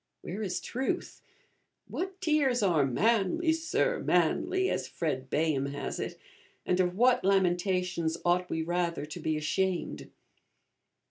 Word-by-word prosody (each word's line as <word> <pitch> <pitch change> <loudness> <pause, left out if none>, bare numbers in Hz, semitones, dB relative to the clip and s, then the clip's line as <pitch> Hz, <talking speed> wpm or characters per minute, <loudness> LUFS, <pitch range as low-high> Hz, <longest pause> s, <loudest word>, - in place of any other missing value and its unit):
where 200 +5 -5
is 190 -4 -2
truth? 260 +2 -3 0.7
What 380 +1 -4
tears 290 - +2
are 170 -7 +3
'manly, 225 - +2
Sir, 330 +10 0
manly,' 355 - +2
as - - -1
Fred 130 -6 -3
Bayham 150 -2 +1
has 140 0 -4
it; - - -4 0.5
and 180 - +1
of 180 -1 +1
what 245 +2 +4
lamentations 180 -3 +1
ought 180 +1 +2
we 160 - -1
rather 170 -2 -1
to 155 +3 -8
be 155 -1 -1
ashamed? 180 +4 -1
180 Hz, 130 wpm, -29 LUFS, 165-245 Hz, 0.7 s, what